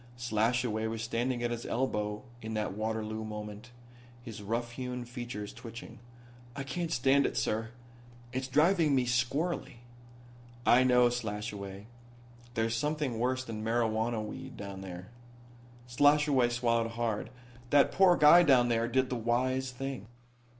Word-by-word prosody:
Slashaway 115 Hz, -1 st, 0 dB
was 110 Hz, 0 st, -4 dB
standing 120 Hz, +2 st, -1 dB
at 120 Hz, -, 0 dB
his 120 Hz, 0 st, -4 dB
elbow 105 Hz, -3 st, -2 dB, 0.2 s
in 110 Hz, 0 st, -5 dB
that 105 Hz, -2 st, -2 dB
Waterloo 110 Hz, +1 st, -3 dB
moment, 105 Hz, +1 st, -7 dB, 0.5 s
his 115 Hz, -4 st, -8 dB
rough 115 Hz, +3 st, -2 dB
hewn 125 Hz, 0 st, -5 dB
features 120 Hz, -4 st, -6 dB
twitching. 115 Hz, -1 st, -10 dB, 0.6 s
"I 140 Hz, -, -4 dB
can't 170 Hz, +4 st, -3 dB
stand 135 Hz, +1 st, +3 dB
it, -, -, -5 dB
sir. 110 Hz, +1 st, -1 dB, 0.6 s
It's 130 Hz, +1 st, -2 dB
driving 155 Hz, +2 st, +3 dB
me 130 Hz, -2 st, +2 dB
squirrelly." 135 Hz, +4 st, -1 dB, 0.9 s
"I 125 Hz, +2 st, +6 dB
know, 125 Hz, -1 st, +5 dB
Slashaway. 105 Hz, -4 st, -5 dB, 0.7 s
There's 115 Hz, 0 st, 0 dB
something 145 Hz, -2 st, -1 dB
worse 130 Hz, +2 st, 0 dB
than 110 Hz, -3 st, -6 dB
marijuana 110 Hz, 0 st, 0 dB
weed 130 Hz, +4 st, -8 dB
down 100 Hz, -1 st, -7 dB
there." 90 Hz, +1 st, -8 dB, 0.8 s
Slashaway 145 Hz, 0 st, +4 dB
swallowed 115 Hz, -1 st, +1 dB
hard. 115 Hz, -2 st, -2 dB, 0.4 s
"That 145 Hz, +2 st, +5 dB
poor 185 Hz, -2 st, +5 dB
guy 155 Hz, +4 st, +8 dB
down 130 Hz, -7 st, +5 dB
there 115 Hz, 0 st, +1 dB
did 130 Hz, +2 st, +1 dB
the -, -, 0 dB
wise 130 Hz, +3 st, 0 dB
thing." 130 Hz, -3 st, -6 dB
120 Hz, 135 wpm, -31 LUFS, 110-130 Hz, 0.9 s, guy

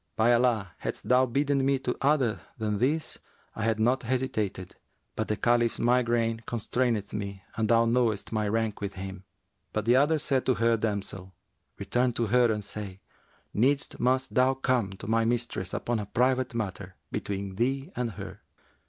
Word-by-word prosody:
By 115 Hz, +2 st, +4 dB
Allah, 115 Hz, -6 st, +2 dB
hadst -, -, -5 dB
thou 130 Hz, +1 st, +5 dB
bidden 140 Hz, +2 st, +1 dB
me 135 Hz, 0 st, +3 dB
to 125 Hz, -2 st, -2 dB
other 135 Hz, -6 st, +2 dB, 0.2 s
than 105 Hz, -3 st, -1 dB
this, 150 Hz, +6 st, 0 dB, 0.4 s
I 110 Hz, -, -2 dB
had 110 Hz, -1 st, +1 dB
not 125 Hz, +4 st, +2 dB
hesitated; 110 Hz, -7 st, -2 dB, 0.4 s
but 110 Hz, -, -2 dB
the 105 Hz, -, -1 dB
Caliph's 120 Hz, -1 st, +2 dB
migraine 120 Hz, -2 st, +2 dB
constraineth 115 Hz, -2 st, -1 dB
me 100 Hz, -2 st, -5 dB
and 110 Hz, -1 st, 0 dB
thou 115 Hz, 0 st, +5 dB
knowest 115 Hz, -3 st, +1 dB
my 110 Hz, -2 st, 0 dB
rank 110 Hz, -1 st, -1 dB
with 100 Hz, -1 st, -4 dB
him.' 95 Hz, 0 st, -7 dB, 0.5 s
But 110 Hz, -1 st, -2 dB
the 120 Hz, +2 st, +5 dB
other 150 Hz, +4 st, +4 dB
said 140 Hz, -3 st, +1 dB
to 130 Hz, -, +4 dB
her 115 Hz, 0 st, +3 dB
damsel, 100 Hz, -4 st, -3 dB, 0.4 s
'Return 120 Hz, +5 st, 0 dB
to 115 Hz, -, 0 dB
her 120 Hz, +1 st, +4 dB
and 105 Hz, -2 st, -3 dB
say, 100 Hz, -2 st, -7 dB, 0.5 s
'Needs 135 Hz, +6 st, +1 dB
must 130 Hz, +2 st, +1 dB
thou 130 Hz, +1 st, +4 dB
come 125 Hz, -7 st, 0 dB
to 95 Hz, -, -10 dB
my 115 Hz, +1 st, +2 dB
mistress 115 Hz, -5 st, -1 dB
upon 120 Hz, -2 st, -1 dB
a 105 Hz, -, -5 dB
private 130 Hz, +2 st, +1 dB
matter 95 Hz, -4 st, -4 dB, 0.2 s
between 100 Hz, -1 st, -3 dB
thee 135 Hz, -, -1 dB
and 120 Hz, -3 st, -2 dB
her!' 100 Hz, -1 st, -8 dB
115 Hz, 170 wpm, -28 LUFS, 105-125 Hz, 0.5 s, thou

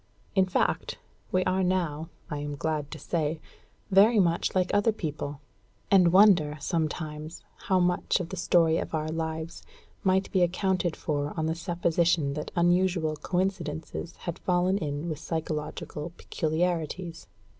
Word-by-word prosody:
In 190 Hz, -1 st, +3 dB
fact, 185 Hz, -, 0 dB, 0.3 s
we 185 Hz, 0 st, +2 dB
are 185 Hz, +1 st, +1 dB
now, 170 Hz, -4 st, -1 dB, 0.2 s
I 150 Hz, -, -4 dB
am 145 Hz, 0 st, -4 dB
glad 150 Hz, -1 st, -2 dB
to 155 Hz, -, -7 dB
say, 155 Hz, +1 st, -2 dB, 0.5 s
very 210 Hz, +4 st, +6 dB
much 170 Hz, -1 st, +1 dB
like 185 Hz, -1 st, +1 dB
other 205 Hz, +2 st, +4 dB
people; 150 Hz, -7 st, -5 dB, 0.5 s
and 180 Hz, -4 st, +6 dB
wonder, 180 Hz, -6 st, +5 dB
sometimes, 155 Hz, 0 st, -3 dB, 0.2 s
how 190 Hz, -1 st, +3 dB
much 180 Hz, +1 st, +1 dB
of 175 Hz, -2 st, -4 dB
the 190 Hz, -, -5 dB
story 165 Hz, -2 st, +3 dB
of -, -, -3 dB
our 155 Hz, 0 st, -2 dB
lives 160 Hz, 0 st, -4 dB, 0.4 s
might 190 Hz, 0 st, +2 dB
be 190 Hz, -, +2 dB
accounted 180 Hz, -1 st, +1 dB
for 145 Hz, -2 st, -2 dB
on 160 Hz, -, 0 dB
the 160 Hz, -, 0 dB
supposition 170 Hz, -3 st, +1 dB
that 150 Hz, +1 st, -4 dB
unusual 175 Hz, -2 st, +2 dB
coincidences 170 Hz, -1 st, -3 dB
had 170 Hz, -2 st, -6 dB
fallen 180 Hz, +2 st, +1 dB
in 145 Hz, -1 st, -3 dB
with 155 Hz, -3 st, -3 dB
psychological 155 Hz, 0 st, -4 dB
peculiarities. 165 Hz, +1 st, -2 dB
170 Hz, 145 wpm, -28 LUFS, 155-185 Hz, 0.5 s, very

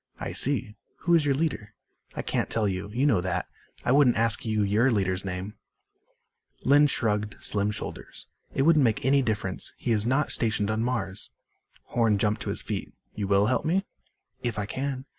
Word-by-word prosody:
"I -, -, -4 dB
see. 125 Hz, -6 st, +1 dB, 0.3 s
Who 170 Hz, -, +2 dB
is 160 Hz, -3 st, +4 dB
your 140 Hz, -, +3 dB
leader?" 125 Hz, -9 st, -2 dB, 0.4 s
"I -, -, -3 dB
can't -, -, -1 dB
tell 110 Hz, -2 st, +1 dB
you. 95 Hz, +1 st, -3 dB
You 125 Hz, +6 st, 0 dB
know 115 Hz, -11 st, +3 dB
that. 90 Hz, 0 st, -2 dB, 0.4 s
I -, -, +2 dB
wouldn't 135 Hz, -3 st, +5 dB
ask 115 Hz, 0 st, +1 dB
you 110 Hz, -2 st, 0 dB
your 105 Hz, +6 st, +3 dB
leader's 95 Hz, -5 st, 0 dB
name." 95 Hz, +2 st, -5 dB, 1.1 s
Lynn 145 Hz, +2 st, +6 dB
shrugged 105 Hz, -5 st, -1 dB
slim 100 Hz, 0 st, +1 dB
shoulders. 105 Hz, -, -6 dB, 0.3 s
"It 135 Hz, -, 0 dB
wouldn't 155 Hz, 0 st, +5 dB
make 115 Hz, -3 st, +1 dB
any 140 Hz, +1 st, +4 dB
difference. 105 Hz, -6 st, -3 dB
He 120 Hz, -, -2 dB
is 110 Hz, 0 st, +2 dB
not 135 Hz, +4 st, +1 dB
stationed 110 Hz, -3 st, +1 dB
on 110 Hz, +1 st, -1 dB
Mars." 105 Hz, -6 st, -3 dB, 0.5 s
Horn 115 Hz, -3 st, +1 dB
jumped 105 Hz, +1 st, 0 dB
to -, -, -4 dB
his -, -, -3 dB
feet. -, -, -4 dB, 0.2 s
"You 100 Hz, -2 st, -3 dB
will 100 Hz, +1 st, +4 dB
help 125 Hz, +3 st, +1 dB
me?" 190 Hz, +5 st, +1 dB, 0.6 s
"If 120 Hz, -3 st, -2 dB
I 105 Hz, -, -1 dB
can." 130 Hz, +3 st, -4 dB
110 Hz, 185 wpm, -27 LUFS, 105-130 Hz, 1.1 s, Lynn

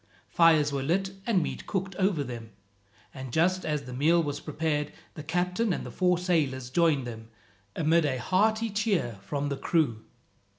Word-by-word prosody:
Fires 160 Hz, -3 st, +4 dB
were 140 Hz, -, -1 dB
lit 190 Hz, +7 st, 0 dB, 0.2 s
and 195 Hz, -7 st, +3 dB
meat -, -, -5 dB
cooked 195 Hz, -1 st, -3 dB
over 185 Hz, -6 st, +1 dB
them; 120 Hz, -3 st, -7 dB, 0.6 s
and 130 Hz, -2 st, -7 dB
just 185 Hz, +6 st, +2 dB
as 150 Hz, -2 st, -2 dB
the 125 Hz, -, -8 dB
meal 165 Hz, +6 st, +3 dB
was 145 Hz, -1 st, -3 dB
prepared 150 Hz, 0 st, -2 dB, 0.2 s
the 155 Hz, -, -8 dB
captain 180 Hz, +7 st, 0 dB
and -, -, -2 dB
the -, -, -7 dB
four 180 Hz, -1 st, +2 dB
sailors 145 Hz, -8 st, 0 dB
joined 155 Hz, -4 st, +2 dB
them, 115 Hz, -2 st, -8 dB, 0.5 s
amid 165 Hz, +1 st, +3 dB
a 130 Hz, -3 st, 0 dB
hearty 220 Hz, -, +1 dB
cheer 195 Hz, -, 0 dB
from 145 Hz, +7 st, -3 dB
the 140 Hz, -, -2 dB
crew. 135 Hz, -11 st, 0 dB
160 Hz, 170 wpm, -28 LUFS, 140-180 Hz, 0.6 s, Fires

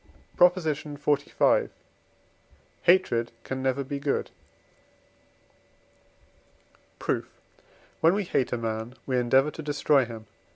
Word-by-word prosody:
PROP. 180 Hz, 0 st, +6 dB
XLV. 150 Hz, -3 st, 0 dB, 1.1 s
Hatred 170 Hz, -11 st, +3 dB
can 130 Hz, 0 st, -4 dB
never 135 Hz, +1 st, 0 dB
be 140 Hz, +1 st, -5 dB
good. 140 Hz, 0 st, -1 dB, 2.7 s
Proof. -, -, -3 dB, 0.6 s
When 165 Hz, +4 st, +4 dB
we 205 Hz, -, 0 dB
hate 135 Hz, -8 st, -1 dB
a 120 Hz, -, 0 dB
man, 115 Hz, +1 st, -4 dB
we 130 Hz, -2 st, 0 dB
endeavour 130 Hz, +4 st, +3 dB
to 160 Hz, -, -8 dB
destroy 145 Hz, -2 st, +2 dB
him 115 Hz, -2 st, -8 dB
(III. -, -, -20 dB
140 Hz, 110 wpm, -27 LUFS, 125-155 Hz, 2.7 s, PROP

